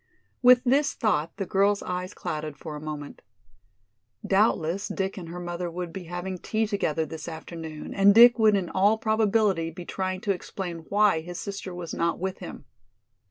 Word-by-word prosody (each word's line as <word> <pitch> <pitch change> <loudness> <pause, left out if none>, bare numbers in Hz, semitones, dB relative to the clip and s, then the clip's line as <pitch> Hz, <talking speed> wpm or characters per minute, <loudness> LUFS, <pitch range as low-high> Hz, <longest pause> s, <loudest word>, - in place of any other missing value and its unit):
With 250 0 +7
this 280 +3 +2
thought 165 -8 0
the 195 - -2
girl's 200 +2 +2
eyes 180 0 -4
clouded 155 -1 -5
for 155 -1 -7
a 150 - -7
moment. 150 -2 -7 1.0
Doubtless 195 -2 +1
Dick 190 0 -3
and 175 -4 -8
her 175 +1 -6
mother 175 0 -4
would 175 0 -6
be 185 -1 -7
having 180 +2 -5
tea 220 +4 -1
together 165 -7 -1
this 155 0 -8
afternoon 160 -1 -7
and 200 +1 +5
Dick 240 +1 +8
would 215 -2 +5
in 190 -3 0
all 205 +3 +3
probability 215 -6 +1
be 175 +2 -9
trying 185 0 -3
to 205 - 0
explain 175 -3 -6
why 205 -4 +3
his 175 +2 -7
sister 200 -2 -6
was 175 -2 -6
not 170 0 0
with 190 +1 -4
him. 175 -5 -9
185 Hz, 175 wpm, -26 LUFS, 165-205 Hz, 1.0 s, Dick